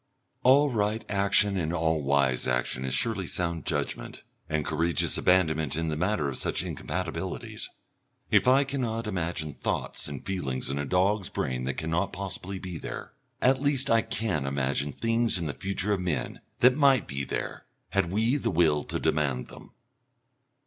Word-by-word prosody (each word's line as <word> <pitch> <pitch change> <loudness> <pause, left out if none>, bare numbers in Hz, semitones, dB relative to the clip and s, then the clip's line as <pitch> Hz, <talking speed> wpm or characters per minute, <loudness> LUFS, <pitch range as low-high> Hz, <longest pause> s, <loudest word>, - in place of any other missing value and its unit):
All 140 +3 +5
right 105 -1 0
action 100 0 +2
and 80 -2 -1
all 80 -2 +1
wise 70 -2 +2
action 60 +1 0
is 65 -1 +1
surely 100 +2 +1
sound 85 -1 -2
judgment 75 -5 -2 0.3
and 80 -2 0
courageous 85 +2 +1
abandonment 80 -6 +2
in 80 0 -1
the 75 - -1
matter 90 -2 0
of 70 - -3
such - - 0
incompatibilities. 90 -2 -4 0.6
If - - +4
I 135 +2 +6
cannot 120 -5 -2
imagine 85 -6 -2
thoughts - - -2
and 70 -3 -7
feelings 70 -10 -2
in 70 - -2
a 70 - -2
dog's 95 +2 +2
brain 65 -1 -2
that 70 - -2
cannot 85 +5 -1
possibly 95 0 -4
be 90 -3 -6
there, - - -7 0.3
at 130 +1 +4
least 140 -3 +2
I 115 0 +5
can 90 -12 -2
imagine 70 +1 0
things 115 +4 +2
in 85 - -2
the 75 - -2
future 100 +1 -1
of 100 - 0
men 90 -4 -3 0.2
that 125 +1 +6
might 135 -6 +4
be 70 0 -3
there - - -4 0.2
had 95 -3 0
we 115 +7 +2
the - - -1
will 80 -3 +3
to - - -3
demand 70 -4 0
them.... - - -13
90 Hz, 170 wpm, -28 LUFS, 75-105 Hz, 0.6 s, I